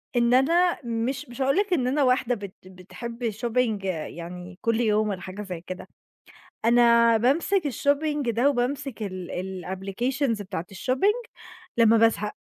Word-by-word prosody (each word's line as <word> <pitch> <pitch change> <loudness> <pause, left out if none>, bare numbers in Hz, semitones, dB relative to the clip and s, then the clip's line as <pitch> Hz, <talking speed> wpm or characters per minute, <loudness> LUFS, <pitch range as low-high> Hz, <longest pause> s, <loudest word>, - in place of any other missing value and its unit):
إن 240 0 +3
أنا 340 +7 +4
مش 235 +3 -2
مش 245 +2 -7
هاقول 275 +4 +2
لِك 405 -1 +1
إن 255 -7 +1
أنا 280 +3 +2
واحدة 250 -1 +2
بت 200 -3 -8
بتحب 230 +6 -6
shopping 225 -2 -1
يعني 175 +1 -6
كل 230 0 +1
يوم 215 -1 +2
والّا 190 -3 -4
حاجة 190 +3 -7
زي 180 -5 -6
كده. 185 - -7 0.8
أنا 235 0 +5
بامسك 300 - +2
الshopping 285 0 0
ده، 235 +5 +2
وبامسك 270 -1 -2
ال 185 -3 -5 0.4
الapplications 210 +6 -2
بتاعة 185 -3 -5
الshopping 400 - 0 0.5
لمّا 230 -1 +6
بازهق. 220 -2 +2
235 Hz, 145 wpm, -25 LUFS, 200-265 Hz, 0.8 s, لمّا